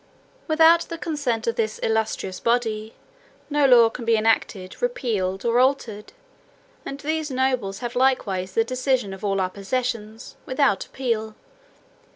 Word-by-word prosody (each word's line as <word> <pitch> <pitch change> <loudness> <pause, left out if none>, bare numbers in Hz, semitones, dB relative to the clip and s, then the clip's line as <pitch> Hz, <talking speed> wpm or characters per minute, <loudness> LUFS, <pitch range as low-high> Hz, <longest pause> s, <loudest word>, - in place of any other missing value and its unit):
"Without 325 +1 +6
the 335 - -5
consent 285 -9 -2
of 230 - -1
this 215 -1 -1
illustrious 220 -4 -1
body, 225 -2 -1 0.6
no 290 -1 +4
law 240 -3 +7
can 230 +1 -7
be 230 0 +3
enacted, 215 -4 0
repealed, 215 - -1
or 235 +1 +3
altered: 250 -5 0 0.7
and 275 - -7
these 310 +1 -2
nobles 255 -6 -1
have 240 - -5
likewise 200 -8 0
the 225 - +4
decision 255 -3 -1
of 190 - -11
all 195 -1 0
our 185 -1 -1
possessions, 225 +2 -4
without 260 -6 +1
appeal." 220 -4 -3
230 Hz, 140 wpm, -23 LUFS, 215-265 Hz, 0.7 s, law